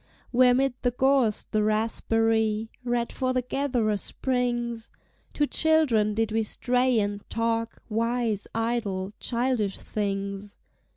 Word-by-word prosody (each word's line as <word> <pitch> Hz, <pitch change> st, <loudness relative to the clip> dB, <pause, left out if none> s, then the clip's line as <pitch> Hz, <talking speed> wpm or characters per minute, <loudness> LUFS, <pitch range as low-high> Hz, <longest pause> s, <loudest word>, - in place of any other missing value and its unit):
Where 250 Hz, 0 st, +5 dB
'mid 270 Hz, 0 st, +2 dB
the 245 Hz, -, +2 dB
gorse 255 Hz, -3 st, +2 dB
the 215 Hz, -, -1 dB
raspberry 220 Hz, 0 st, +1 dB
Red 240 Hz, -1 st, -1 dB
for 255 Hz, -1 st, -1 dB
the 255 Hz, -1 st, 0 dB
gatherer 245 Hz, -5 st, 0 dB
springs, 240 Hz, -1 st, -2 dB, 0.4 s
Two 295 Hz, -, +1 dB
children 280 Hz, -10 st, +2 dB
did 225 Hz, -1 st, 0 dB
we 225 Hz, +1 st, +1 dB
stray 245 Hz, +2 st, +1 dB
and 205 Hz, 0 st, -2 dB
talk 230 Hz, 0 st, -1 dB
Wise, 230 Hz, -1 st, -1 dB
idle, 220 Hz, -5 st, -1 dB
childish 235 Hz, -4 st, 0 dB
things. 200 Hz, -1 st, -4 dB
230 Hz, 120 wpm, -26 LUFS, 215-250 Hz, 0.4 s, Where